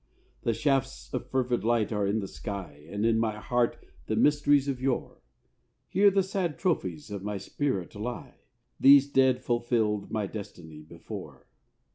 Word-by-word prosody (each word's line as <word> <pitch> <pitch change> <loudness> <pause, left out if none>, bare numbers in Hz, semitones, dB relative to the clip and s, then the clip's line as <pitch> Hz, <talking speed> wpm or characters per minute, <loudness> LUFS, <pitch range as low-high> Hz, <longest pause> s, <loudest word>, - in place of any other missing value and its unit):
The 115 - 0
shafts 115 - -1
of - - -4
fervid 125 -4 0
light 115 -1 +1
are 105 -2 0
in 105 +2 0
the 100 - -4
sky, 75 -3 -7
And 100 +3 -2
in 115 -1 +3
my 110 -2 0
heart 120 +2 0 0.3
the - - 0
mysteries 145 -1 +3
of 130 -2 -2
yore. 130 -2 -2 0.7
Here 200 +1 +5
the 195 0 +2
sad 185 -5 -2
trophies 95 - -2
of 100 -2 -4
my 105 0 -3
spirit 100 -5 -2
lie: 120 +4 -6 0.4
These 140 0 +7
dead 130 -2 +3
fulfilled 115 -4 0
my 105 -2 -1
destiny 85 -7 -9
before. 80 +2 -10
115 Hz, 155 wpm, -28 LUFS, 100-135 Hz, 0.7 s, These